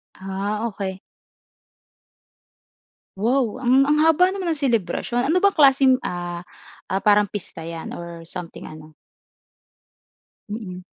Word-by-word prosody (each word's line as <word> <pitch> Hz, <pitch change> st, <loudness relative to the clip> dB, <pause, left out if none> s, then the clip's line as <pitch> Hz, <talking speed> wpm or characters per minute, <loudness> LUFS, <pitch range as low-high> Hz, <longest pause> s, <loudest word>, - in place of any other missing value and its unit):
Ah, 200 Hz, +3 st, -3 dB
okey. 195 Hz, -3 st, -4 dB, 2.2 s
Wow! 235 Hz, +2 st, +1 dB
A -, -, -6 dB
ng, 260 Hz, +3 st, +5 dB
ang 300 Hz, +1 st, +3 dB
haba 325 Hz, +3 st, +5 dB
naman 375 Hz, -3 st, -2 dB
ng 315 Hz, -, -4 dB
selebrasyon. 240 Hz, -, 0 dB
Ano 360 Hz, +3 st, +3 dB
bang 400 Hz, 0 st, +3 dB
klaseng, 270 Hz, -3 st, +6 dB
ah, 175 Hz, -1 st, -4 dB, 0.5 s
ah, 190 Hz, -, 0 dB
parang 205 Hz, -1 st, +4 dB
pista 175 Hz, -5 st, -7 dB
'yan 165 Hz, 0 st, -6 dB
or 170 Hz, -1 st, -9 dB
something 180 Hz, -2 st, -8 dB
ano? 155 Hz, 0 st, -12 dB, 1.6 s
Mm. 190 Hz, -4 st, -6 dB
210 Hz, 120 wpm, -22 LUFS, 180-270 Hz, 2.2 s, klaseng